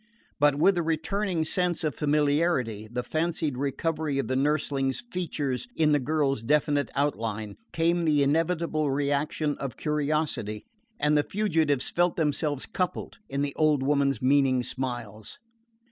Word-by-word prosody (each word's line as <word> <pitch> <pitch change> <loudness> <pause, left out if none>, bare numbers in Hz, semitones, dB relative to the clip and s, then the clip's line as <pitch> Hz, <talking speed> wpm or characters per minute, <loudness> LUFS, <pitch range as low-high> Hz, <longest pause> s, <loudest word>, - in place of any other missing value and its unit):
But 145 -1 +4
with 175 +7 +4
the 175 - 0
returning 165 +2 -1
sense 180 +1 -1
of 155 -3 0
familiarity 145 -7 +1
the 125 0 -2
fancied 160 -2 -1
recovery 145 +2 -1
of 140 - -1
the 130 - -1
nurseling's 135 -1 0
features 150 - -2
in 155 -2 +3
the 145 - +4
girl's 140 -2 0
definite 145 +2 +2
outline 110 -7 -2 0.2
came 170 +1 +1
the 150 -3 +3
inevitable 160 0 +1
reaction 145 +2 0
of 135 -4 -5
curiosity, 150 -8 -1 0.3
and 150 +1 +2
the 150 - +5
fugitives 160 -10 0
felt 175 0 +2
themselves 150 -2 -1
coupled 185 -4 -3
in 140 +1 -1
the 140 -1 -2
old 150 -3 +2
woman's 140 -3 +1
meaning 130 -1 +3
smiles. 120 -5 -5
145 Hz, 140 wpm, -27 LUFS, 135-160 Hz, 0.3 s, the